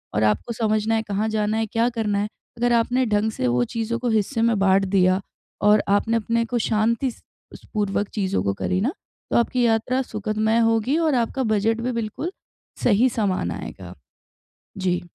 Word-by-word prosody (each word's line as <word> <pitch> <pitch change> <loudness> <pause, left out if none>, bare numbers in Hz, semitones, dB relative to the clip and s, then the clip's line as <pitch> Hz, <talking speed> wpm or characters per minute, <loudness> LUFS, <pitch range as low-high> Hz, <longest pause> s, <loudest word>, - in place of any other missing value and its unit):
और 105 - +2
आपको 105 - +1
समझना 215 0 +1
है 220 - +1
कहाँ 210 +1 -1
जाना 215 0 0
है? 225 - +1
क्या 230 +2 +1
करना 220 -4 -1
है। 205 - -1 0.3
अगर 240 0 +2
आपने 245 +2 +2
ढंग 210 +1 +1
से 125 -12 -2
वो 120 0 +2
चीज़ों 230 +1 -1
को 245 -1 -1
हिस्से 220 +2 0
में 230 -1 +3
बाँट 195 0 +3
दिया 185 0 +2 0.4
और 210 0 +5
आपने 215 +3 +2
अपने 230 +1 0
को 240 +1 -2
शांति 230 +4 +1
स - - -18 0.3
स, - - -14
पूर्वक 205 -1 0
चीज़ों 190 - -1
को 100 0 0
करी 185 - -1
ना 245 +7 +1 0.4
तो - - +3
आपकी 245 +1 +1
यात्रा 235 +3 +1
सुखदमय 215 -1 0
होगी 230 +7 +1
और 320 -4 +2
आपका 245 +2 0
बजट 220 0 +1
भी 250 +2 -1
बिल्कुल 235 - -3 0.5
सही 240 +3 +4
सामान 195 - -1
आएगा। 90 0 -8 0.8
जी। 180 -2 0
220 Hz, 185 wpm, -23 LUFS, 200-235 Hz, 0.8 s, और